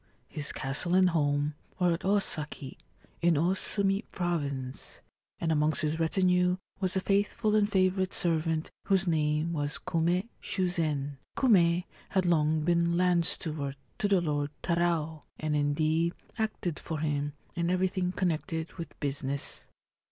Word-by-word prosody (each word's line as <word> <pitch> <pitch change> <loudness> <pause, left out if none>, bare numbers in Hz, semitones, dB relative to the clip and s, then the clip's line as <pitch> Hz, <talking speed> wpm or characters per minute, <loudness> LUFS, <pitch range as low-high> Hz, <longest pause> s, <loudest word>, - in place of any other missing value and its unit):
His 150 -1 -2
castle 135 +7 -1
and 185 -1 +5
home 145 -2 +1 0.2
were 180 -2 +3
at 165 - -2
Osaki, 155 -8 -1 0.4
in 170 -1 +4
Osumi 195 +5 +1
Province, 140 -7 -3 0.4
and 165 - 0
amongst 155 +1 +2
his 155 +1 0
retinue 180 +2 +3 0.2
was 185 -1 0
a - - +3
faithful 205 +2 +1
and 210 -1 +3
favourite 185 0 +2
servant 160 -2 0
whose 195 -1 +3
name 155 0 +1
was 145 -2 -2
Kume 175 +4 0
Shuzen. 155 -7 -1 0.2
Kume 180 -8 +4 0.3
had 190 -1 +1
long 155 -2 +3
been 170 +1 +2
land 180 -2 +3
steward 145 -4 -1 0.2
to 205 - +2
the 195 -3 +3
Lord 145 -3 -1
Tarao, 170 -3 0 0.2
and 155 -1 -1
indeed 155 +3 +1 0.2
acted 215 -7 -2
for 160 - -4
him 145 -1 -1 0.2
in 170 0 -1
everything 185 0 +1
connected 165 -3 -2
with 170 - -7
business. 140 -1 -2
170 Hz, 135 wpm, -30 LUFS, 150-185 Hz, 0.4 s, and